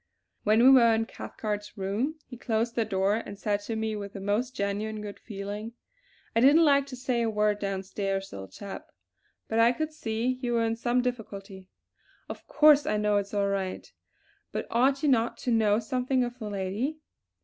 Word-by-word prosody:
When 215 +2 +4
we 260 - +9
were 235 -4 +6
in 225 0 0
Cathcart's 210 -2 -6
room, 205 +10 -1
he 250 - -10
closed 230 -1 -1
the 230 -2 0
door 195 +2 +1
and 205 -3 -7
said 205 0 0
to 225 - -3
me 220 0 -2
with 200 -1 -6
the 200 - -6
most 210 +6 -1
genuine 205 +2 -2
good 210 -1 -7
feeling: 205 +2 -6 0.6
"I - - +4
didn't 290 +7 +6
like 280 -1 +4
to 270 - -7
say 250 -1 -1
a 230 - +1
word 210 -1 +1
downstairs, 195 0 -3
old 95 0 -8
chap; 200 -1 -8 0.6
but 225 - 0
I 230 +1 +6
could 310 +5 -3
see 240 -1 -2
you 240 -2 -1
were 230 -1 +2
in 225 0 0
some 240 +2 0
difficulty. 200 -6 -5 0.6
Of - - -9
course 300 -1 +5
I 215 - +1
know 210 -1 +2
it's 200 +1 -3
all 200 -1 +1
right; 195 -2 -3 0.6
but - - -3
ought 270 +4 +2
you 295 - +3
not 235 -3 +2
to 250 - -1
know 215 -2 +3
something 250 +3 0
of 245 +1 -5
the 215 -3 -5
lady? 205 +10 -2
220 Hz, 195 wpm, -28 LUFS, 205-245 Hz, 0.6 s, we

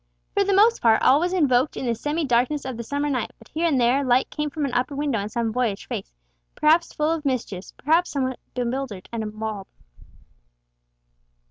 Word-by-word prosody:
For 405 - +3
the 395 0 +1
most 445 +4 +5
part 225 -2 +5
all 275 - +6
was 355 +2 0
invoked 285 -7 +2
in - - -3
the 235 - +1
semi 295 +7 -2
darkness 260 +3 +1
of 260 -2 -4
the 235 - -5
summer 285 +5 -2
night, 255 -5 -1
but 225 - -18
here 330 +3 0
and 280 -6 +2
there 250 +4 +3
light 255 0 +2
came 300 -1 -2
from 300 0 -2
an 265 - -4
upper 255 +3 0
window 280 -5 0
on 200 +1 -4
some 230 0 -1
boyish 225 -4 -1
face, - - -5 0.4
perhaps 325 +3 +3
full 305 0 0
of 330 -2 -2
mischief, 240 -9 -2
perhaps 330 +5 +2
somewhat 260 -3 -2 0.2
bewildered 245 -5 -3
and 230 -1 -3
appalled. 215 -2 -5
265 Hz, 200 wpm, -24 LUFS, 235-300 Hz, 0.4 s, all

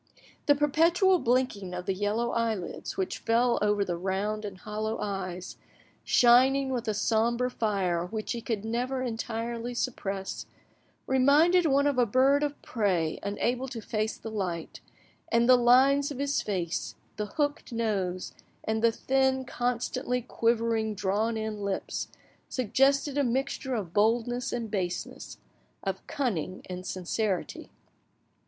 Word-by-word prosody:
The 290 - +6
perpetual 335 +6 +3
blinking 230 - 0
of 180 0 -5
the 195 - 0
yellow 210 +5 -1
eyelids 225 -6 -2
which 190 - -2
fell 235 +1 +2
over 205 -1 +2
the 175 - -2
round 195 +4 -2
and 195 -2 -6
hollow 215 +2 -3
eyes, 185 -3 -4 0.4
shining 265 +3 +5
with 245 -2 -2
a 215 - 0
sombre 235 +3 +1
fire 185 -7 0
which 215 +3 -4
he 235 - -3
could 220 -3 -3
never 250 +3 -1
entirely 235 0 -3
suppress, 195 -6 -3 0.6
reminded 300 +7 +4
one 280 0 +3
of 285 -3 +2
a 245 - +4
bird 265 +6 +4
of 290 -1 -2
prey 180 -8 0
unable 240 +6 -1
to 245 -3 -6
face 215 0 -2
the 225 - -7
light, 180 -6 -4 0.5
and 235 +1 +3
the 255 - +8
lines 265 +4 +5
of 285 - -6
his 280 +1 0
face, 180 -5 -3 0.2
the 210 - -2
hooked 290 -3 -1
nose, 200 -6 -2 0.3
and 220 0 -1
the 230 - +5
thin, 265 +2 +1
constantly 250 +1 -1
quivering, 230 -2 0
drawn 210 +4 0
in 220 -1 -4
lips 200 -1 -3 0.4
suggested 270 +4 +2
a - - +3
mixture 265 +1 -1
of 190 -7 -4
boldness 240 +4 +1
and 230 -3 -3
baseness, 180 -4 -4 0.5
of 195 -1 -4
cunning 190 - -2
and 185 0 -6
sincerity. 190 +1 -2
230 Hz, 140 wpm, -28 LUFS, 200-255 Hz, 0.6 s, the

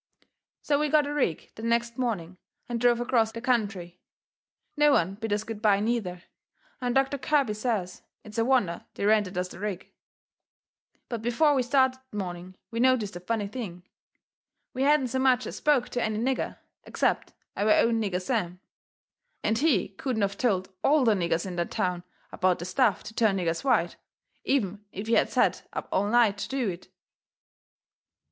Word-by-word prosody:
So 285 -1 +2
we 300 0 +1
got 300 0 +4
a 290 - -3
rig 255 - -1
the - - -10
next 235 +1 0
morning 185 -8 -2 0.3
and 235 -1 -3
drove 240 -1 +4
acrost 230 -2 +1
the - - -4
country. 200 -8 -1 0.8
No 295 -1 +5
one 185 -5 +2
bid 220 +2 -5
us 210 +1 0
good 220 -1 -7
bye, 205 -3 +4
neither, 205 -5 -2 0.6
and 245 0 -1
Doctor 270 +1 +2
Kirby 280 -6 +1
says 210 -5 -2 0.2
it's 215 +1 -6
a - - +4
wonder 235 -9 +1
they - - -2
rented 205 -3 +2
us 180 0 -1
the - - -11
rig. 200 -3 -5 1.2
But 235 -3 -4
before 265 +7 +3
we 265 - +2
started 260 +1 +2
that 210 - -8
morning 180 -1 -5 0.2
we 230 - -3
noticed 240 -6 +2
a - - -5
funny 205 +3 -2
thing. 200 -6 -7 0.9
We 255 - -3
hadn't 280 -2 +3
so 260 +2 -1
much 255 -1 +3
as - - -6
spoke 285 -5 +2
to 245 - -2
any 215 -2 -1
nigger, 255 +4 -1 0.3
except - - -1 0.2
our 210 +2 +1
own 230 +1 +4
nigger 190 -4 -1
Sam, 180 -4 -2 0.8
and 220 +1 +1
he 305 0 +2
couldn't 220 +2 -2
of 200 0 0
told 195 -5 0
ALL 295 0 +4
the 225 - +5
niggers 170 -3 0
in 180 -2 -5
that 170 - -1
town 180 -1 -1 0.3
about 185 -1 +1
the 175 - -6
stuff 215 +1 +1
to 220 - -9
turn 220 -3 +2
niggers 170 +1 -1
white, 220 -11 +1 0.5
even 210 -7 0
if 200 +3 -6
he 225 - 0
had - - +4
set - - +1
up - - -4
all 200 +2 +1
night 225 -3 +3
to - - -4
do 265 -5 -1
it. 175 0 -7
220 Hz, 180 wpm, -27 LUFS, 190-255 Hz, 1.2 s, No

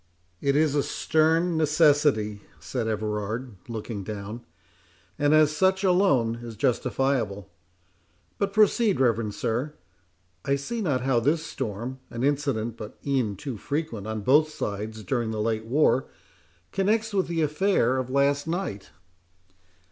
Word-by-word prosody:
"It 140 0 +1
is 150 -1 +3
a 145 - +2
stern 160 +4 +1
necessity," 145 -9 +3 0.2
said 120 -4 -3
Everard, 110 +2 -3
looking 110 -2 -5
down, 105 +3 -6 0.8
"and 145 0 +3
as 155 -1 +5
such 190 +3 +2
alone 160 - +3
is 115 -2 -8
justifiable. 120 -5 0 0.9
But 200 -1 0
proceed, 215 0 +3
reverend 115 -4 +1
sir; 120 +8 -2 0.7
I 140 - +1
see 225 +12 -4
not 145 - 0
how 130 -2 +2
this 155 +7 +1
storm, 120 +1 -5
an 120 +1 -5
incident 135 -6 0
but 105 - -9
e'en 130 -7 0
too 115 +4 -6
frequent 140 -5 -3
on 110 -1 -3
both 145 +7 +4
sides 110 -7 -5
during 115 +3 -1
the 110 -1 -3
late 110 0 -1
war, 130 +1 +2 0.6
connects 215 +3 +1
with 190 -2 +1
the 165 -1 0
affair 150 -3 +2
of 130 -1 -2
last 140 +2 +2
night." 160 - -3
135 Hz, 135 wpm, -26 LUFS, 110-155 Hz, 0.9 s, as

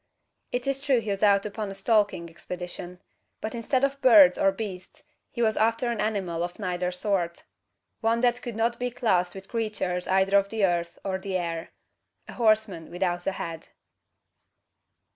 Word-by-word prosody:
It 245 0 -2
is 275 0 -1
true 275 -3 +3
he 215 -2 -3
was 195 - -3
out 200 -1 +4
upon 210 0 -4
a 195 - -7
stalking 200 -4 +1
expedition; 180 +1 -7 0.4
but 220 - -4
instead 255 +3 0
of 275 0 0
birds 210 -9 +8
or 195 - +3
beasts, 190 -2 -7 0.3
he 235 - -2
was 220 -1 +2
after 230 +2 +1
an 230 - -2
animal 195 -6 -1
of 175 0 -4
neither 180 -3 -2
sort; 180 -2 -2 0.6
one 230 +1 +1
that 245 0 +2
could 240 -3 -6
not 230 +2 0
be 250 0 -1
classed 190 -8 +1
with 195 0 -9
creatures 210 -6 -2
either 190 +1 +4
of 200 0 -4
the 220 -2 +2
earth 170 -2 -1
or 190 -1 -1
the 190 -1 -2
air 170 -2 -4 0.6
a - - -9
horseman 215 -7 +1
without 175 -1 -2
a 195 - +1
head! 165 -3 -6
200 Hz, 175 wpm, -26 LUFS, 180-225 Hz, 0.6 s, birds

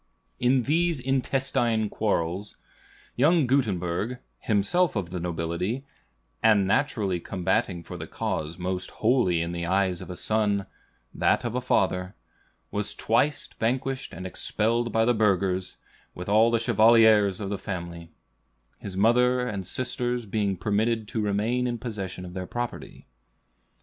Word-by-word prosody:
In 125 0 +3
these 165 +3 +1
intestine 125 -3 0
quarrels, 100 -2 -2 0.6
young 155 +4 +4
Gutenberg, 110 -3 0 0.2
himself 135 - +1
of 95 -4 -3
the 90 - -3
nobility, 85 +9 -3 0.6
"and 105 -3 +4
naturally 105 -4 0
combating 95 0 -1
for - - -8
the - - -7
cause 80 +2 -3
most 90 0 -3
holy 110 -8 +2
in 85 - -4
the 85 0 -3
eyes 95 -1 +1
of - - -9
a 90 - -5
son, 105 -1 0 0.5
that - - +1
of 120 - -2
a 125 - -1
father," 95 -5 0 0.6
was 105 0 -1
twice 135 +6 +1
vanquished 130 +3 -2
and 90 +2 -8
expelled 115 +5 +1
by 110 +1 +2
the 120 - +3
burghers, 95 -4 0 0.4
with 90 - -7
all 110 +3 +5
the 115 - +2
chevaliers 110 -3 +5
of 100 -2 -4
the 100 - -3
family, 85 -4 -6 0.7
his 95 -2 -7
mother 125 +4 +3
and 100 -6 -4
sisters 125 -1 -1
being 100 -2 -1
permitted 110 +4 0
to 110 - -2
remain 110 +5 0
in 120 -1 -2
possession 100 -6 -6
of 90 - -9
their 90 -1 -5
property. 120 0 -6
105 Hz, 140 wpm, -26 LUFS, 95-120 Hz, 0.7 s, all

